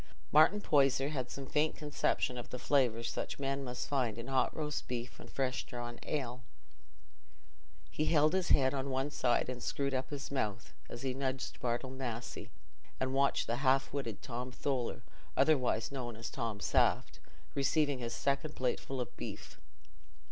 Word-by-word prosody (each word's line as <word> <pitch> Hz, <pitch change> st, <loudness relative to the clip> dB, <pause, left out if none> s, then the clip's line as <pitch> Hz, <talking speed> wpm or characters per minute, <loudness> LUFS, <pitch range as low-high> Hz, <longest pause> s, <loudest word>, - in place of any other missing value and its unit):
Martin 155 Hz, +7 st, +7 dB
Poyser 140 Hz, -6 st, +3 dB
had 130 Hz, -5 st, -3 dB
some 140 Hz, -, -6 dB
faint 150 Hz, +3 st, +1 dB
conception 145 Hz, -3 st, 0 dB
of 120 Hz, -, -6 dB
the 125 Hz, -, -4 dB
flavour 125 Hz, -4 st, +2 dB
such -, -, -3 dB
men 135 Hz, 0 st, -1 dB
must 125 Hz, -1 st, -4 dB
find 130 Hz, -6 st, 0 dB
in 115 Hz, -, -5 dB
hot 130 Hz, -1 st, +3 dB
roast 150 Hz, -1 st, -2 dB
beef 125 Hz, 0 st, -4 dB
and -, -, -11 dB
fresh 130 Hz, -2 st, -1 dB
drawn 120 Hz, -1 st, -6 dB
ale. 130 Hz, -4 st, -3 dB, 1.5 s
He 155 Hz, -, 0 dB
held 155 Hz, 0 st, +4 dB
his 185 Hz, -2 st, +1 dB
head 130 Hz, -1 st, +5 dB
on 140 Hz, 0 st, -1 dB
one 135 Hz, +2 st, 0 dB
side 125 Hz, -4 st, +2 dB
and 125 Hz, -1 st, -4 dB
screwed 140 Hz, -1 st, -1 dB
up 130 Hz, 0 st, -1 dB
his 140 Hz, -2 st, -5 dB
mouth, 115 Hz, -5 st, -2 dB, 0.2 s
as 120 Hz, -, -7 dB
he 130 Hz, -1 st, 0 dB
nudged 135 Hz, 0 st, -3 dB
Bartle 125 Hz, +2 st, -1 dB
Massey, 125 Hz, -3 st, -5 dB, 0.5 s
and 130 Hz, 0 st, 0 dB
watched 140 Hz, +1 st, +3 dB
half 130 Hz, +3 st, +2 dB
witted 125 Hz, -7 st, -3 dB
Tom 125 Hz, +1 st, -4 dB
Tholer, 130 Hz, -2 st, -2 dB, 0.3 s
otherwise 130 Hz, -5 st, +3 dB
known 120 Hz, -4 st, -4 dB
as 115 Hz, +1 st, -6 dB
"Tom 115 Hz, -5 st, -3 dB
Saft," -, -, +2 dB, 0.3 s
receiving 140 Hz, 0 st, +2 dB
his 115 Hz, -1 st, -3 dB
second 140 Hz, +2 st, 0 dB
plateful 130 Hz, +1 st, -1 dB
of 125 Hz, -, -4 dB
beef. -, -, -7 dB
130 Hz, 160 wpm, -34 LUFS, 125-140 Hz, 1.5 s, Martin